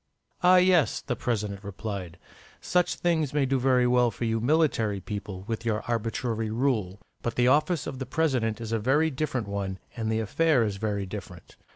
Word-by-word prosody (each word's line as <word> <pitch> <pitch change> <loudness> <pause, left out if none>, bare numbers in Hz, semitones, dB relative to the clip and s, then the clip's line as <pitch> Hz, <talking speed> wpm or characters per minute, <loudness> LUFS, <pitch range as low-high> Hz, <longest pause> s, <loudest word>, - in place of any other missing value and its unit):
"Ah 180 0 +6
yes," 180 -3 +4
the 125 - -3
President 105 -4 -2
replied, 100 -3 -6 0.4
"such 180 -1 +1
things 160 -5 0
may 145 -2 +3
do 135 0 +1
very 125 -1 +3
well 125 0 +4
for 115 +2 -4
you 115 0 0
military 120 -7 +2
people, 100 -1 -6
with 115 +1 -4
your 110 -2 -1
arbitrary 115 -1 -2
rule. 110 -5 0 0.2
But 120 - -3
the 125 0 +3
office 150 +4 +2
of 130 - -6
a - - -2
President 130 -8 0
is 115 -1 -6
a 115 - +1
very 145 +8 +2
different 130 -5 -2
one, 100 -1 -3 0.2
and 110 -2 -2
the 110 - +1
affair 135 +4 +2
is 105 -3 -2
very 100 -1 -2
different. 95 -3 -9
115 Hz, 185 wpm, -27 LUFS, 105-135 Hz, 0.4 s, Ah